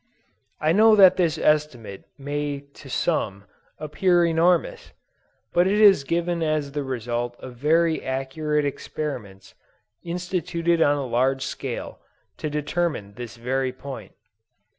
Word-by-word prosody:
I 155 +1 +2
know 215 +4 +6
that 190 -3 +7
this 165 -4 +1
estimate 145 -11 0
may 145 0 -3
to 135 - -13
some, 105 - -1 0.3
appear 175 +3 +2
enormous; 170 +1 +1 0.6
but 175 +1 +4
it 205 +2 +2
is 200 -8 +6
given 170 +3 -1
as 155 -3 -1
the 145 +1 -3
result 120 -2 -3
of 130 - -10
very 160 +5 +2
accurate 145 +3 -1
experiments, 125 -9 -6 0.5
instituted 170 -1 -1
on 145 -2 +4
a 140 - -3
large 130 +2 0
scale, - - -5 0.4
to 155 - -3
determine 150 - -2
this 120 +1 -8
very 130 +2 -1
point. 135 +1 -9
150 Hz, 125 wpm, -24 LUFS, 130-170 Hz, 0.6 s, that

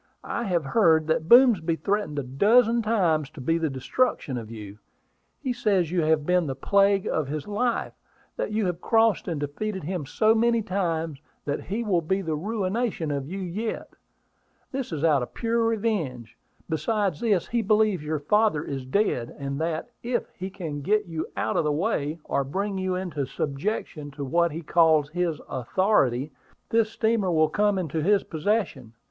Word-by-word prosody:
I 235 - -3
have 175 -5 0
heard 160 -1 +4
that 160 +1 -1
Boomsby 225 -10 +6
threatened 200 -4 -1
a 140 - -1
dozen 225 - +3
times 175 -10 +1
to 155 - -13
be 165 +6 0
the 160 -2 0
destruction 135 - -1
of 115 -3 -6
you. 105 -2 -9 0.6
He 255 - -2
says 200 -8 +1
you 180 -1 +1
have 155 -1 +2
been 180 -1 +2
the 135 - -3
plague 200 +6 +3
of 155 -4 -1
his 150 +3 -4
life; 230 +4 -1 0.4
that - - -3
you 215 -1 0
have 180 -1 -2
crossed 225 -2 +2
and 165 -5 -2
defeated 190 +7 -4
him 170 -3 -4
so 215 +8 +3
many 230 0 +2
times 165 -6 -2 0.2
that 145 0 -3
he 215 +5 -2
will 190 -6 +1
be 190 +4 -1
the 160 -3 -1
'ruination' 200 -1 -2
of 140 -1 -3
you 190 +4 -5
yet. 200 +5 -4 0.8
This 270 -5 -4
is 155 -2 -3
out 150 -5 +4
of 125 - -6
pure 230 0 0
revenge. 205 - -1 0.3
Besides 195 0 -1
this, 205 -7 +1
he 235 0 +1
believes 210 -5 +2
your 155 +1 -1
father 210 -1 +2
is 135 -4 -5
dead, 130 - 0
and 140 +1 -4
that, 165 +7 -2
if 240 +1 -2
he 190 +1 -5
can 165 -7 -6
get 210 +7 +1
you 165 -3 -4
out - - 0
of - - +2
the 150 - +1
way, 155 -2 -1
or 140 - 0
bring 195 +8 -3
you 185 -1 -1
into 165 -7 -3
subjection 150 - -3
to 140 - -3
what 170 +4 +2
he 165 +3 -6
calls 155 -2 +4
his 170 -1 -1
authority, 135 - +1 0.4
this 225 -1 +3
steamer 220 -4 +1
will 155 -2 +3
come 205 +3 +2
into 160 -3 -2
his 200 +4 +3
possession. 160 - -2
175 Hz, 180 wpm, -25 LUFS, 150-210 Hz, 0.8 s, Boomsby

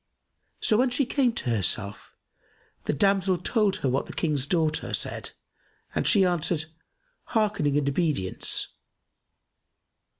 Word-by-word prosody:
So, 215 - +4
when 255 +2 +3
she 260 +3 +1
came 255 -1 +2
to 125 - -2
herself, 100 -1 -1 0.7
the - - +1
damsel 195 +2 +2
told 205 +2 +1
her - - -2
what 130 +2 0
the - - -8
King's 145 -5 -1
daughter 160 -2 0
said - - -2 0.6
and - - 0
she 200 -4 +5
answered, 170 -2 0 0.6
"Hearkening 205 - +1
and 145 -1 0
obedience." 140 - 0
170 Hz, 125 wpm, -26 LUFS, 140-210 Hz, 0.7 s, she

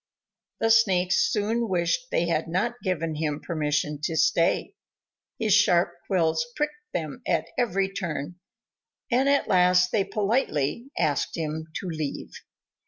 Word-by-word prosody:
The 225 - +2
Snakes 190 -5 +3
soon 225 +2 0
wished 180 +7 0
they 170 - +1
had 165 -2 0
not 235 +9 -1
given 165 -5 -1
him 150 -1 -2
permission 150 -2 -2
to 165 - -2
stay. 165 +2 +2 0.6
His 220 -3 +1
sharp 180 -4 +4 0.2
quills 165 -4 +1
pricked 300 0 -1 0.2
them 160 - -4
at - - 0
every 195 -5 0
turn, 175 -2 -4 0.7
and 260 +3 +3
at 280 0 +2
last 180 0 +4
they 205 - +2
politely 210 - -1
asked 145 +2 0
him 160 0 -3
to - - -4
leave. 155 -4 -4
180 Hz, 135 wpm, -26 LUFS, 160-215 Hz, 0.7 s, sharp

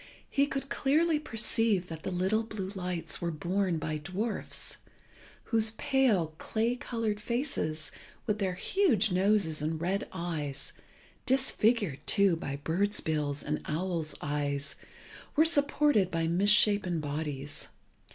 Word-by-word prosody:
He 280 0 +3
could 275 -1 -3
clearly 310 +4 +2
perceive 225 - +2
that 160 -1 -7
the - - -3
little 190 +4 +1
blue 215 -4 -5
lights 180 -3 -3
were 170 - -1
borne 175 +3 -1
by 155 -1 -3
dwarfs, 200 +7 -2 0.7
whose 220 -1 +1
pale 215 - +2
clay 230 +2 0
coloured 225 -4 -3
faces, 225 - -2 0.3
with 210 -2 -1
their 190 -3 -1
huge 225 - +2
noses 185 -4 +2
and 155 +1 -2
red 185 +4 -1
eyes, 155 -6 -3 0.5
disfigured, 230 - +2
too, 200 -4 +4
by 140 -4 -4
birds' 185 +8 0
bills 150 -2 -1
and 150 +1 -2
owls' 165 -1 -1
eyes, 140 -1 -1 0.6
were 315 +1 +5
supported 285 - +3
by 165 -2 -1
misshapen 200 0 +4
bodies. 145 -1 -4
190 Hz, 125 wpm, -30 LUFS, 160-225 Hz, 0.7 s, were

